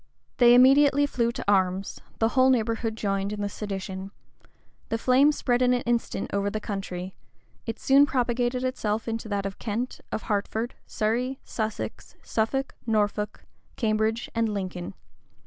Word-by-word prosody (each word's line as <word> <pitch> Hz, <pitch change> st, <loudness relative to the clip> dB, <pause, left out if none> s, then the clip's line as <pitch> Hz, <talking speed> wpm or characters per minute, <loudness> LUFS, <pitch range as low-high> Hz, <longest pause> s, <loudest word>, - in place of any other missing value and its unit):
They 240 Hz, -1 st, +7 dB
immediately 280 Hz, +3 st, +6 dB
flew 235 Hz, -4 st, 0 dB
to -, -, -6 dB
arms: 190 Hz, -1 st, +1 dB, 0.2 s
the 225 Hz, -, +2 dB
whole 260 Hz, +2 st, +4 dB
neighborhood 225 Hz, -2 st, +1 dB
joined 200 Hz, -2 st, -1 dB
in 210 Hz, -, -4 dB
the 205 Hz, -, 0 dB
sedition: 195 Hz, -2 st, -5 dB, 0.8 s
the 225 Hz, -, 0 dB
flame 260 Hz, +5 st, +4 dB
spread 245 Hz, -4 st, 0 dB
in 250 Hz, 0 st, +4 dB
an 245 Hz, -, -1 dB
instant 235 Hz, -4 st, -1 dB
over 200 Hz, 0 st, +1 dB
the 215 Hz, +1 st, -3 dB
county: 190 Hz, -3 st, -5 dB, 0.5 s
it 225 Hz, -, -3 dB
soon 275 Hz, +2 st, +5 dB
propagated 245 Hz, 0 st, 0 dB
itself 225 Hz, -4 st, -1 dB
into 225 Hz, -1 st, -3 dB
that 200 Hz, -1 st, -1 dB
of 195 Hz, 0 st, -5 dB
Kent, 235 Hz, +3 st, -3 dB
of -, -, -3 dB
Hertford, 220 Hz, +3 st, -2 dB
Surrey, 245 Hz, +5 st, -1 dB
Sussex, 220 Hz, -1 st, -5 dB
Suffolk, 270 Hz, +5 st, -1 dB
Norfolk, 210 Hz, -1 st, 0 dB, 0.3 s
Cambridge, 220 Hz, 0 st, 0 dB
and 230 Hz, -1 st, +1 dB
Lincoln. 185 Hz, -3 st, -4 dB
225 Hz, 145 wpm, -26 LUFS, 205-245 Hz, 0.8 s, They